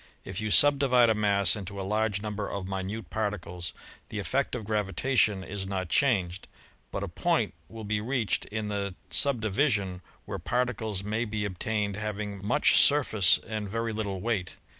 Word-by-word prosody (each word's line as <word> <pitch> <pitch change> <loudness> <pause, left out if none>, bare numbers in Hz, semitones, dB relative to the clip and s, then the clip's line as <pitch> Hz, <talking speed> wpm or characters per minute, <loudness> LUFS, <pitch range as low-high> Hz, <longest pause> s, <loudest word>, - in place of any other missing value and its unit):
If 100 - -4
you 110 - -2
subdivide 130 -2 +6
a - - +4
mass 100 -4 +3
into 100 -1 -6
a - - -3
large 105 0 0
number 105 -1 -3
of 100 -2 -4
minute 95 +2 -4
particles 90 -5 -3 0.4
the - - -5
effect - - -1
of 110 - -5
gravitation 105 0 +1
is 95 0 -5
not 95 -3 -3
changed, 95 -9 +1 0.4
but - - -4
a - - -2
point - - 0 0.2
will 110 -1 -8
be 105 0 -1
reached 120 -1 0
in 110 0 -4
the 100 -2 -3 0.2
subdivi 125 0 +2
sion 95 -5 -2 0.2
where - - -5
particles 115 -5 -1
may 110 +3 -1
be 105 -2 -2
obtained 100 +1 -2
having 105 -2 -4
much 145 +9 +4
surface 110 -10 +5
and 110 -2 -4
very 115 +1 -2
little 100 -3 -3
weight. 105 -5 -2
105 Hz, 165 wpm, -28 LUFS, 100-110 Hz, 0.4 s, subdivide